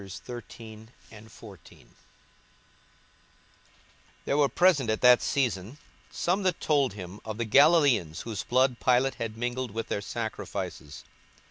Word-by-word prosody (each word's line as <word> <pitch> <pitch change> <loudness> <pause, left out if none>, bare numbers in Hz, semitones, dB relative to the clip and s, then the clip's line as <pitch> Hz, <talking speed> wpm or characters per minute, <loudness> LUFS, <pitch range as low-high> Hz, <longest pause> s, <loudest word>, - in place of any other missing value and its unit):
42:013:001 110 0 -12 2.4
There - - 0
were 145 -1 +3
present 145 -4 +3
at 110 - -1
that 125 -1 +6
season 120 -3 -2 0.3
some 185 +4 -1
that 185 -3 0
told 140 -7 +1
him 95 0 -9
of 110 -1 -6
the 115 - -2
Galilaeans, 135 - +4
whose 110 -4 -5
blood 130 0 +1
Pilate 125 +2 +2
had 110 -1 -4
mingled 120 +1 -3
with 115 +2 -6
their 100 - -2
sacrifices. 100 -8 -6
115 Hz, 115 wpm, -27 LUFS, 105-135 Hz, 2.4 s, that